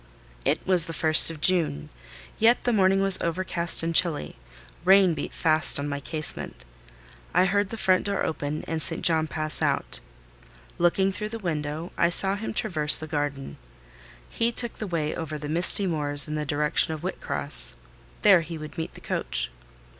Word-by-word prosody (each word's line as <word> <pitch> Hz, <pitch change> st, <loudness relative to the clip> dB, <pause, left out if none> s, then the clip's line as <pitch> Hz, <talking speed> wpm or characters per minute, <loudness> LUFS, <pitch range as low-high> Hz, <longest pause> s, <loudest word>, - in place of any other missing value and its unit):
It -, -, 0 dB
was 185 Hz, -2 st, +4 dB
the 165 Hz, -, -5 dB
first 155 Hz, 0 st, +4 dB
of 160 Hz, -2 st, -9 dB
June; 160 Hz, -, +1 dB, 0.5 s
yet 230 Hz, +2 st, +3 dB
the 245 Hz, -, 0 dB
morning 195 Hz, -2 st, +3 dB
was 195 Hz, -1 st, +3 dB
overcast 170 Hz, -1 st, -1 dB
and 165 Hz, 0 st, -2 dB
chilly: 165 Hz, -3 st, +2 dB, 0.5 s
rain 190 Hz, -1 st, +5 dB
beat -, -, -5 dB
fast 155 Hz, -1 st, +1 dB
on 140 Hz, +1 st, -4 dB
my 140 Hz, -1 st, -4 dB
casement. 155 Hz, -, -3 dB, 0.7 s
I 185 Hz, -, +4 dB
heard 200 Hz, +1 st, 0 dB
the 225 Hz, -, -6 dB
front 185 Hz, -3 st, +1 dB
door 200 Hz, 0 st, -2 dB
open, 150 Hz, -1 st, -4 dB
and 160 Hz, -1 st, -3 dB
St. 165 Hz, +1 st, +1 dB
John 160 Hz, -2 st, +2 dB
pass 155 Hz, 0 st, -2 dB
out. -, -, -2 dB, 0.8 s
Looking 190 Hz, +3 st, +2 dB
through 210 Hz, +2 st, -5 dB
the 230 Hz, -, -6 dB
window, 160 Hz, -3 st, -4 dB
I 170 Hz, -, +3 dB
saw 190 Hz, +3 st, +2 dB
him 215 Hz, +2 st, -5 dB
traverse 155 Hz, -7 st, +3 dB
the 155 Hz, -, -5 dB
garden. 145 Hz, -3 st, -4 dB, 0.7 s
He 230 Hz, +1 st, -1 dB
took 240 Hz, 0 st, -2 dB
the 215 Hz, -, -4 dB
way 165 Hz, -4 st, -2 dB
over 160 Hz, -2 st, -5 dB
the 150 Hz, 0 st, -7 dB
misty 175 Hz, +5 st, +3 dB
moors 145 Hz, -4 st, +2 dB
in 150 Hz, -, -5 dB
the 150 Hz, -1 st, -3 dB
direction 150 Hz, +3 st, 0 dB
of 155 Hz, -, -10 dB
Whitcross—there -, -, -1 dB
he 165 Hz, 0 st, -7 dB
would 155 Hz, +1 st, -9 dB
meet 160 Hz, -, -6 dB
the -, -, -11 dB
coach. -, -, -2 dB
165 Hz, 175 wpm, -25 LUFS, 150-185 Hz, 0.8 s, rain